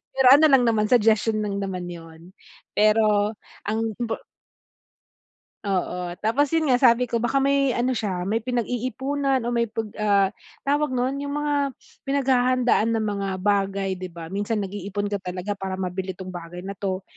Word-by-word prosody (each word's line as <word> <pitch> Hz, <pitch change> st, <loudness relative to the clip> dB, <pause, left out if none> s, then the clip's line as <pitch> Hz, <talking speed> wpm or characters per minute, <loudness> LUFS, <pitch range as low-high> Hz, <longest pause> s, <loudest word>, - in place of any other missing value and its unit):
Pero 265 Hz, -1 st, +4 dB
ano 290 Hz, +4 st, +8 dB
lang 265 Hz, -2 st, +6 dB
naman, 215 Hz, -2 st, +2 dB
suggestion 220 Hz, -2 st, +3 dB
lang 200 Hz, -1 st, -2 dB
naman 185 Hz, -2 st, -4 dB
yun. 165 Hz, 0 st, -11 dB, 0.5 s
Pero 215 Hz, 0 st, +3 dB, 0.3 s
ang 215 Hz, +2 st, 0 dB, 0.2 s
impor 230 Hz, -2 st, -3 dB, 1.4 s
Oo, 180 Hz, -2 st, -2 dB
tapos 270 Hz, +8 st, +1 dB
yun 315 Hz, -3 st, +2 dB
nga 250 Hz, -, +5 dB
sabi 245 Hz, -1 st, +4 dB
ko 235 Hz, -, +1 dB
baka 255 Hz, +4 st, +1 dB
may 275 Hz, -2 st, +2 dB
ano 245 Hz, +2 st, +1 dB
siya 205 Hz, -7 st, -2 dB
may 205 Hz, +5 st, 0 dB
pinag-iipunan 255 Hz, +3 st, -1 dB
o 235 Hz, -, -2 dB
may 235 Hz, -1 st, +1 dB
pag, 220 Hz, -1 st, -5 dB
ah 200 Hz, -2 st, +3 dB, 0.3 s
tawag 290 Hz, -1 st, 0 dB
nun, 255 Hz, +2 st, 0 dB
yung 285 Hz, 0 st, -4 dB
mga 295 Hz, 0 st, 0 dB, 0.5 s
pinaghahandaan 255 Hz, -4 st, +2 dB
ng 225 Hz, -, 0 dB
mga 200 Hz, -2 st, -2 dB
bagay 195 Hz, -1 st, 0 dB
'di 185 Hz, -, -5 dB
ba, 165 Hz, -2 st, -9 dB
minsan 205 Hz, +2 st, -1 dB
nag-iipon 205 Hz, +1 st, -4 dB
ka 205 Hz, -, -1 dB
talaga 185 Hz, +2 st, -5 dB
para 190 Hz, -1 st, -3 dB
mabili 185 Hz, 0 st, -3 dB
tong 185 Hz, +1 st, -8 dB
bagay 175 Hz, 0 st, -8 dB
na 195 Hz, +1 st, -7 dB
to. 190 Hz, -1 st, -2 dB
215 Hz, 165 wpm, -24 LUFS, 195-250 Hz, 1.4 s, ano